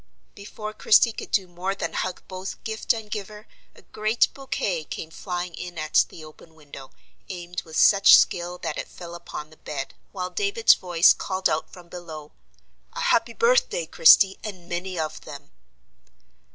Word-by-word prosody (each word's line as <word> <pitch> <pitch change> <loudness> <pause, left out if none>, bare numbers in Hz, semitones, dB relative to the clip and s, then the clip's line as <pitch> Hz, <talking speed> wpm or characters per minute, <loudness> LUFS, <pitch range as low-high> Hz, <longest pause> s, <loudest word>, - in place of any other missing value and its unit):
Before 215 +1 -8
Christie 215 +2 +4
could - - -8
do 190 -3 +1
more 180 +3 -4
than - - -4
hug 185 -1 -3
both 185 0 -7
gift 220 -1 -1
and 220 -2 -4
giver, 210 0 -6 0.3
a - - -18
great 215 +2 +1
bouquet 200 - -3
came 160 +1 -7
flying 180 0 -5
in 175 0 -8
at 155 0 +2
the 160 - -11
open 160 +1 -16
window, 140 -3 -12 0.4
aimed 180 -1 -6
with 160 -2 -8
such 200 -1 +7
skill 175 0 0
that - - -3
it - - -5
fell 170 -1 -11
upon 155 -3 -8
the 155 - -17
bed, 135 -2 -6 0.2
while 185 -2 -5
David's 415 +2 +4
voice 175 -1 +4
called 190 -1 -1
out 155 - -2
from 180 -1 -14
below: 160 -4 -9 0.6
"A - - -6
happy 230 0 +2
birthday, - - +2
Christie, 195 - +6
and 185 -5 -8
many 180 +1 -4
of 155 -1 -4
them!" - - -11
180 Hz, 165 wpm, -24 LUFS, 170-210 Hz, 0.6 s, such